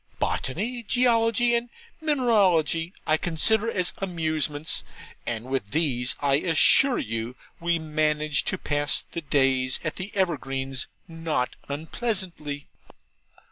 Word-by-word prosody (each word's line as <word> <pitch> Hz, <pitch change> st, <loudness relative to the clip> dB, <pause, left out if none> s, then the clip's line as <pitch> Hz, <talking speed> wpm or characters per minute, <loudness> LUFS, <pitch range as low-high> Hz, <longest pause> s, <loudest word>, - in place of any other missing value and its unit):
Botany, 220 Hz, -, -2 dB
Geology, 235 Hz, 0 st, +3 dB
and 235 Hz, +1 st, 0 dB, 0.3 s
Mineralogy, 195 Hz, -, +3 dB
I 155 Hz, -, +3 dB
consider 205 Hz, +8 st, +1 dB
as 185 Hz, -5 st, 0 dB
amusements. 160 Hz, -4 st, -1 dB, 0.4 s
And 115 Hz, 0 st, -3 dB
with 130 Hz, -6 st, -2 dB
these 130 Hz, -5 st, 0 dB
I 140 Hz, -1 st, +3 dB
assure 180 Hz, -, +5 dB
you 115 Hz, +2 st, -3 dB, 0.2 s
we 170 Hz, 0 st, +1 dB
manage 155 Hz, -1 st, +1 dB
to 185 Hz, -, -1 dB
pass 145 Hz, -3 st, 0 dB
the 170 Hz, -, -4 dB
days 135 Hz, -3 st, +2 dB
at 155 Hz, -1 st, -3 dB
the 190 Hz, +2 st, -5 dB
Evergreens 135 Hz, -8 st, -1 dB, 0.2 s
not 165 Hz, -6 st, -2 dB
unpleasantly.' 160 Hz, -2 st, -3 dB
160 Hz, 110 wpm, -26 LUFS, 140-200 Hz, 0.4 s, assure